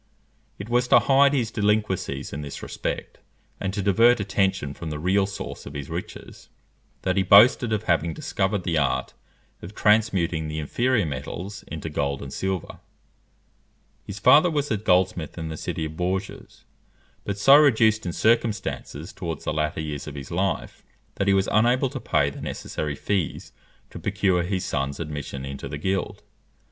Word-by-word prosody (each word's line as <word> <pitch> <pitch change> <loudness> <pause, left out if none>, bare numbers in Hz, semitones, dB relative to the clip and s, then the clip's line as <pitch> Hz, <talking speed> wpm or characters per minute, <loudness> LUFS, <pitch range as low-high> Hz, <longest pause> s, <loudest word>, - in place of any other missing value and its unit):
It 100 - -7
was 120 +1 +1
to - - +7
hide 140 +1 +4
his 120 -5 0
delinquencies 105 - -1
in 70 - -4
this 70 -1 -7
respect, - - -5 0.4
and 95 - -2
to 100 0 -3
divert 115 +5 +4
attention 95 -7 0
from 80 +2 -7
the 75 - -4
real 95 +5 +1
source 100 - -7
of 70 - -9
his 70 -1 -6
riches, - - -8 0.5
that 95 0 0
he - - +4
boasted 110 +5 +6
of 110 -1 0
having 85 -4 +1
discovered 95 0 -1
the 85 -3 +1
art 70 -3 -1 0.5
of 95 +5 -10
transmuting 95 -7 +2
the 75 0 -5
inferior 120 - +1
metals 90 +8 -6
into 80 0 -6
gold 70 -3 -2
and 70 - -8
silver. 95 -3 -3 1.2
His 100 - -8
father 150 - +6
was 145 -3 -1
a 110 - +2
goldsmith 90 -5 +1
in 80 -1 -4
the 80 - -5
city 80 - -4
of 80 0 -7
Bourges; 95 +2 -4 0.6
but 100 -1 -3
so 135 +7 +7
reduced 110 -7 +4
in 90 - -3
circumstances 110 -7 -1
towards 85 -4 -5
the - - -2
latter 75 0 -1
years 75 -2 -5
of 75 - -7
his 70 -2 -8
life, 95 +2 -2 0.3
that 100 - -1
he 100 - +5
was 95 0 +2
unable 125 +4 +3
to - - -5
pay 70 0 +1
the - - -10
necessary 75 -2 -4
fees 95 -1 -2 0.4
to - - -8
procure 95 -3 +1
his 95 +1 -2
son's 70 +1 -2
admission 75 -4 -5
into 70 0 -6
the 75 - -5
guild. 95 +5 -2
95 Hz, 170 wpm, -24 LUFS, 75-105 Hz, 1.2 s, to